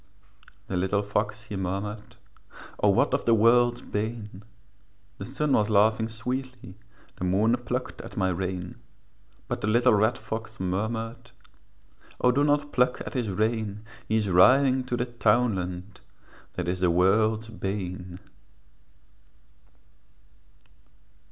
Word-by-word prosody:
The 95 - -3
little 95 +3 0
fox 105 +1 -2
he 105 -1 -7
murmured, 105 +4 -4 0.6
'O - - +4
what - - +3
is - - +1
the 115 - +5
world's 120 +2 +4
bane?' 105 -2 -4 0.8
The 95 - -6
sun 140 +3 -1
was 105 0 +2
laughing 110 +2 +3
sweetly, 125 -1 -5 0.4
The - - -6
moon 100 +6 +3
plucked 125 +1 -4
at - - -11
my 95 -2 +2
rein; 90 0 -4 0.7
But - - -3
the 105 - -1
little 115 +2 +4
red 110 +4 +2
fox 110 0 -6
murmured, 110 +6 -3 0.9
'O 125 - +4
do 140 +3 +2
not 145 0 +1
pluck 125 0 +2
at - - -7
his 120 -5 -1
rein, 110 +1 -1 0.2
He 110 - +1
is 105 -2 0
riding 130 +8 +5
to 125 -1 -2
the 125 - 0
townland, 105 -6 0 0.5
That 90 -1 -4
is 90 +1 -1
the 90 -1 +2
world's 110 +5 +2
bane.' 95 -4 -5
110 Hz, 130 wpm, -26 LUFS, 95-120 Hz, 0.9 s, the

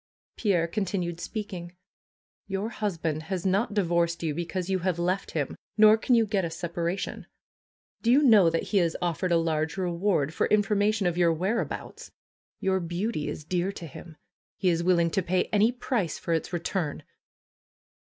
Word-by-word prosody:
Pierre 180 -6 +1
continued 175 -2 -2
speaking: 185 -4 -6 0.8
^^Your 195 +4 -2
husband 165 -8 -2
has 185 -2 -2
not 200 +3 +1
divorced 170 -3 +1
you 155 -2 0
because 175 +3 -3
you 190 -1 0
have 180 -1 -1
left 180 +3 -1
him; 145 -4 -2 0.2
nor 215 0 +8
can 240 +2 +2
you 230 -1 +4
get 200 -2 0
a 170 - -1
separation. 170 +2 -3 0.7
Do 235 - +2
you 280 +4 +5
know 215 -10 +7
that 165 0 -1
he 205 - -1
has 170 -3 +2
offered 175 +1 -1
a - - +5
FAITH 165 - +1
289 160 -1 +1
large 155 +3 -2
reward 175 -4 0
for - - +1
information 205 0 +2
of 175 0 0
your 170 -1 +4
whereabouts? 190 +8 -3 0.5
Your 190 0 +1
beauty 175 0 -2
is - - -5
dear 180 +4 -1
to 175 - -8
him. 160 +2 -11 0.4
He 185 - +2
is 170 -1 +1
willing 170 -2 +3
to 195 - +1
pay 185 +1 +1
any 215 +3 +4
price 240 - -2
for 170 - -2
its 160 - -1
return!" 175 -3 -2
180 Hz, 175 wpm, -27 LUFS, 170-200 Hz, 0.8 s, nor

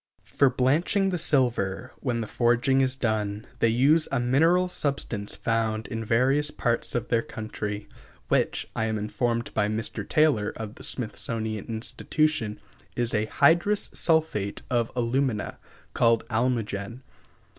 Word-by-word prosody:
For 140 - +2
blanching 155 +10 +2
the 180 -2 -1
silver, 125 - +1
when 120 -3 -1
the 110 - -4
forging 120 +4 +2
is 130 0 +1
done, 110 -4 -1
they - - +4
use 140 +8 +3
a 135 - +1
mineral 165 +9 +3
substance 140 - -2
found 110 -1 -1
in 115 0 -3
various 130 +7 +2
parts 120 -5 -1
of 120 0 -2
their 115 -1 +2
country, 105 -2 -5 0.4
which, - - 0
I 110 - 0
am 110 -1 -1
informed 115 +3 -2
by 105 -1 +1
Mr. 110 +1 -2
Taylor, 150 -10 +2
of 110 -1 -6
the - - -12
Smithsonian 110 -2 -3
Institution, 115 +1 -1 0.4
is 120 -1 0
a 105 0 +1
"hydrous 170 - +3
sulphate 160 - +1
of 120 -2 +1
alumina," 120 -1 -1 0.3
called 115 -1 +3
almogen. 115 -1 -1
120 Hz, 135 wpm, -26 LUFS, 110-135 Hz, 0.4 s, they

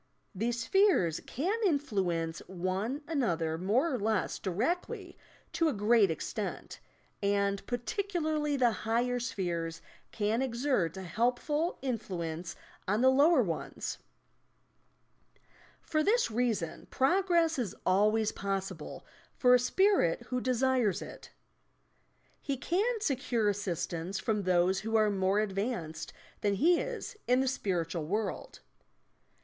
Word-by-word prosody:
These 230 +4 -1
spheres 360 - +3
can 375 - -1
influence 195 - 0
one 190 - -2
another 170 - 0
more 245 - +1
or 255 - -1
less 220 +1 0
directly 230 - -2 0.4
to 330 -1 +2
a - - -1
great 210 -1 +4
extent, 160 - -4 0.4
and 200 0 +1
particularly 310 - -1
the 245 -3 +4
higher 240 +3 0
spheres 170 -7 -3 0.3
can 215 +3 0
exert 235 - 0
a 190 - -5
helpful 250 - 0
in 250 -4 -1
fluence 170 -4 -5 0.3
on 205 +4 +1
the 260 +1 +6
lower 285 +1 +5
ones. 165 -6 -4 1.8
For 310 - 0
this 450 - +2
reason 220 -8 -1
progress 335 +1 +2
is 220 -7 -2
always 210 +3 +3
possible 195 -4 -4 0.3
for 250 -1 +5
a 250 - +7
Spirit 310 - +2
who 250 -1 -1
desires 255 -4 +1
it. - - -11 1.1
He 275 -2 -2
can 415 - 0
secure 245 - +1
assistance 185 -2 -3
from 210 +3 0
those 185 0 +2
who 225 +3 -3
are 215 -1 +4
more 195 +1 +2
advanced 195 -6 -3 0.3
than 205 -1 +1
he 335 - +4
is 485 -4 -5
in 250 +1 +4
the 265 - +1
spiritual 170 -9 -2
world. 210 +3 -3
225 Hz, 120 wpm, -31 LUFS, 190-270 Hz, 1.8 s, a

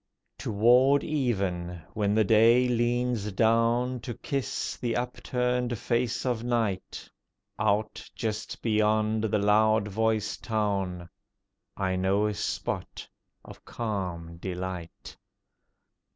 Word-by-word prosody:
Toward 125 +7 +4
even, 95 - -1
when 105 -1 0
the 110 - +4
day 115 +4 +5
leans 120 -2 0
down 115 +4 +2
To 120 0 -6
kiss 140 -2 -3
the 120 -2 -2
upturned 125 0 -1
face 120 +2 -1
of 120 -3 -1
night, 115 -6 -2 0.5
Out 110 0 0
just 110 +3 -4
beyond 110 0 +2
the 105 0 +1
loud 105 +1 +3
voiced 110 +1 -1
town 100 -5 -1 0.7
I 95 -2 0
know 95 +3 +2
a 105 - 0
spot - - -4 0.4
of - - -13
calm 90 -7 -4
delight. 90 -1 -6
110 Hz, 105 wpm, -28 LUFS, 100-120 Hz, 0.7 s, day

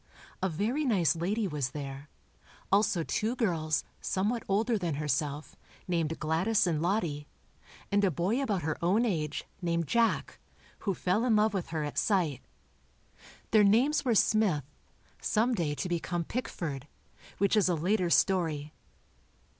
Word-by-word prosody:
A 190 - +1
very 220 - -1
nice 180 - +2
lady 200 +6 -1
was 145 -6 -2
there, 140 +1 -7 0.6
also 200 -3 +3
two 220 +8 -1
girls, 160 -9 0 0.2
somewhat 210 +5 -1
older 220 +4 +1
than 175 -7 -1
herself, 150 0 -2 0.3
named 165 -3 -1
Gladys 170 +8 +2
and 160 -4 0
Lottie, 170 -6 -1 0.6
and 205 0 +3
a 195 - +4
boy 185 - 0
about 205 -10 -1
her 155 +2 -3
own 205 +8 +3
age, 155 -8 -2 0.2
named 170 -1 0
Jack, 235 -1 +1 0.5
who 195 - +1
fell 185 +7 0
in 240 -3 +3
love 215 0 +3
with 190 -4 -2
her 155 -2 -3
at 145 - -2
sight. 165 - +1 1.1
Their 215 -1 +6
names 240 +9 +3
were 245 -4 +2
Smith, 205 -9 +3 0.6
some 230 +3 +1
day 165 -8 -1
to 180 - -3
become 175 0 -2
Pickford, 160 - -4 0.5
which 200 +1 +2
is 205 -3 +3
a 175 - +2
later 180 +3 +1
story. 160 -6 +1
180 Hz, 145 wpm, -30 LUFS, 155-215 Hz, 1.1 s, Their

